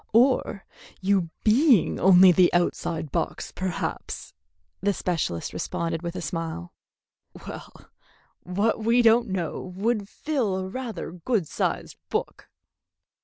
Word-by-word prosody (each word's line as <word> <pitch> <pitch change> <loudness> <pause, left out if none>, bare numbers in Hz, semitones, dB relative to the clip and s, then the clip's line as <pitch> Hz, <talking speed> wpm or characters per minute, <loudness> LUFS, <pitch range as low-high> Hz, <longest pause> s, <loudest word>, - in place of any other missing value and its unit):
"Or 235 -4 +3 0.3
you 190 -3 +1
being 235 - +4
only 185 0 +7
the 180 0 +4
outside 165 -3 -1
box, - - -2
perhaps," 185 -2 -4 0.5
the 200 +2 +2
specialist 165 - -2
responded, 165 -1 -3
with 170 0 -5
a 180 - -4
smile. 160 - -4 0.7
"Well, - - -10 0.5
what 205 +5 0
we 235 +2 +4
don't 230 +1 +5
know 180 -4 -3
would 200 +3 -2
fill 215 -13 -2
rather 235 -6 -5
a - - -11
good 195 -2 0
sized - - -2
book." - - -3
190 Hz, 120 wpm, -25 LUFS, 170-225 Hz, 0.7 s, only